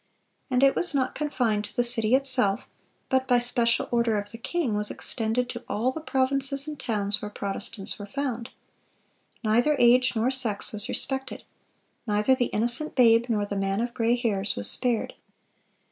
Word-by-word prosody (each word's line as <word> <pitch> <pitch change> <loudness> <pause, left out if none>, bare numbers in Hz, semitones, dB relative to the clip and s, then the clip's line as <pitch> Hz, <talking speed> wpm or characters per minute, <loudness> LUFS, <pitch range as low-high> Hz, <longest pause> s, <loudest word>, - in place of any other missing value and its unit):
And 255 0 +1
it 275 - +5
was 350 -4 +2
not 260 -2 0
confined 240 -8 -1
to 205 - -14
the 245 - +2
city 235 -1 +4
itself, 255 -7 +1 0.4
but 260 -1 0
by 250 -1 +4
special 240 -1 +1
order 235 -2 +1
of 205 0 -5
the 230 - -10
king, 305 -3 -2
was 210 0 -2
extended 225 +2 -1
to 240 0 -7
all 235 +5 0
the 320 - -7
provinces 275 0 0
and 300 -1 -7
towns 210 -3 -1
where 210 - -5
Protestants 200 0 -4
were 205 - -7
found. 245 0 -4 0.9
Neither 240 +7 +2
age 245 +1 +4
nor 230 +4 +1
sex 235 -6 +2
was 215 +3 -6
respected. 265 -1 -3 0.6
Neither 210 +4 +2
the 255 -1 +1
innocent 240 +9 -1
babe 235 -2 +4
nor 210 -3 0
the 205 - -5
man 195 0 -1
of 240 +1 -2
gray 230 +1 +1
hairs 210 -5 -1
was 100 - -3
spared. 240 -3 +1
240 Hz, 175 wpm, -26 LUFS, 210-260 Hz, 0.9 s, it